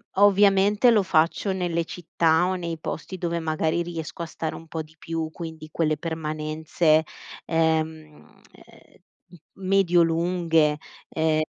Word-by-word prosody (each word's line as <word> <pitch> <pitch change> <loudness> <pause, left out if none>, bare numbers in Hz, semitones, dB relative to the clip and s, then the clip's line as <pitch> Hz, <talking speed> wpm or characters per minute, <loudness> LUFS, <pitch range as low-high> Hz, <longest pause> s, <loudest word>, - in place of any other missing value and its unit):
ovviamente 205 +3 +5
lo 210 -3 +4
faccio 170 +3 +1
nelle 170 -3 -1
città 165 0 +1
o 185 - -1
nei 170 -2 -4
posti 185 +4 -6
dove 170 -1 -2
magari 160 +1 0
riesco 170 0 -6
a - - -3
stare 160 -1 -5
un 165 - -11
po' 160 0 -4
di 155 +1 -20
più, 165 0 -4
quindi 160 -2 -8
quelle 155 -2 0
permanenze, 155 0 0 0.4
ehm, 160 -1 +2
uhm, 155 -1 -15 0.9
m 175 - -15 0.3
medio 185 -3 +4
lunghe, 165 -2 +1 0.3
ehm, 160 -1 +1
165 Hz, 135 wpm, -24 LUFS, 160-175 Hz, 0.9 s, ovviamente